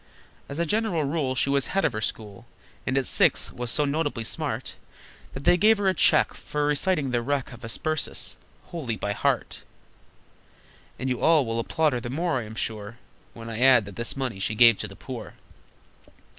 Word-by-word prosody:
As 140 Hz, -, -6 dB
a 170 Hz, -, +1 dB
general 205 Hz, -3 st, 0 dB
rule 140 Hz, -2 st, -1 dB
She 140 Hz, -, +1 dB
was 140 Hz, -1 st, +1 dB
head 195 Hz, -, 0 dB
of -, -, +1 dB
her 110 Hz, -, -3 dB
school, 105 Hz, -3 st, -5 dB, 0.4 s
And 130 Hz, +1 st, +1 dB
at 135 Hz, -, +1 dB
six -, -, +3 dB
was 120 Hz, -1 st, -4 dB
so 150 Hz, +5 st, +3 dB
notably 145 Hz, -4 st, -1 dB
smart 110 Hz, -, -2 dB, 0.6 s
That -, -, -7 dB
they 175 Hz, -, +5 dB
gave 215 Hz, +4 st, +5 dB
her 200 Hz, -1 st, 0 dB
a 190 Hz, -, +4 dB
cheque -, -, +4 dB
For 150 Hz, 0 st, -3 dB
reciting 150 Hz, -1 st, +1 dB
"The 120 Hz, -1 st, +1 dB
Wreck 135 Hz, +1 st, -2 dB
Of 120 Hz, -, -10 dB
the -, -, -8 dB
Hesperus," 155 Hz, +7 st, -1 dB, 0.3 s
wholly 140 Hz, -10 st, -3 dB
by 105 Hz, 0 st, -2 dB
heart! -, -, -1 dB, 1.4 s
And 130 Hz, -, -4 dB
you 125 Hz, -2 st, -1 dB
all 160 Hz, -4 st, +4 dB
will 115 Hz, 0 st, -2 dB
applaud 155 Hz, +5 st, +1 dB
her 125 Hz, -, -1 dB
the 120 Hz, 0 st, -6 dB
more, 160 Hz, +1 st, 0 dB
I 115 Hz, -, -6 dB
am 110 Hz, +1 st, -10 dB
sure, 110 Hz, 0 st, -4 dB, 0.4 s
When 115 Hz, 0 st, -9 dB
I 115 Hz, 0 st, -5 dB
add 125 Hz, -4 st, +6 dB
that 100 Hz, -1 st, -10 dB
this 120 Hz, +3 st, -4 dB
money 125 Hz, -7 st, -3 dB
she 105 Hz, +3 st, -2 dB
gave 115 Hz, -1 st, +6 dB
to -, -, -4 dB
the -, -, -12 dB
poor. -, -, -8 dB
130 Hz, 200 wpm, -26 LUFS, 115-155 Hz, 1.4 s, add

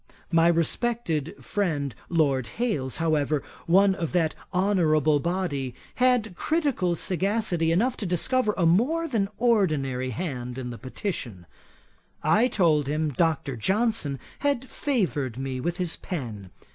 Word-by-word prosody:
My 165 Hz, 0 st, +5 dB
respected 170 Hz, -, 0 dB
friend 155 Hz, -, -1 dB, 0.2 s
Lord 140 Hz, -7 st, +2 dB
Hailes, 155 Hz, -, -1 dB
however, 155 Hz, -3 st, +1 dB, 0.2 s
one 195 Hz, +3 st, +5 dB
of 170 Hz, -4 st, -4 dB
that 165 Hz, -3 st, +2 dB, 0.2 s
honourable 160 Hz, -6 st, +3 dB
body, 145 Hz, -7 st, -2 dB, 0.2 s
had 245 Hz, -6 st, +2 dB
critical 280 Hz, -, 0 dB
sagacity 185 Hz, -1 st, 0 dB
enough 235 Hz, +9 st, +1 dB
to 205 Hz, -, -3 dB
discover 210 Hz, +6 st, +1 dB
a 175 Hz, -, +2 dB
more 260 Hz, -, +2 dB
than 220 Hz, -9 st, 0 dB
ordinary 155 Hz, -, +1 dB
hand 125 Hz, -3 st, -4 dB
in 125 Hz, -2 st, -4 dB
the 120 Hz, -, -8 dB
Petition. 125 Hz, -, -5 dB, 0.8 s
I 235 Hz, +4 st, +4 dB
told 160 Hz, -, +2 dB
him 155 Hz, +2 st, 0 dB
Dr. 150 Hz, -2 st, 0 dB
Johnson 190 Hz, -, 0 dB, 0.2 s
had 280 Hz, -3 st, 0 dB
favoured 170 Hz, -, -1 dB
me 130 Hz, -1 st, -3 dB
with 170 Hz, +6 st, -2 dB
his 180 Hz, -3 st, -1 dB
pen. 115 Hz, -, -6 dB
170 Hz, 130 wpm, -26 LUFS, 140-210 Hz, 0.8 s, My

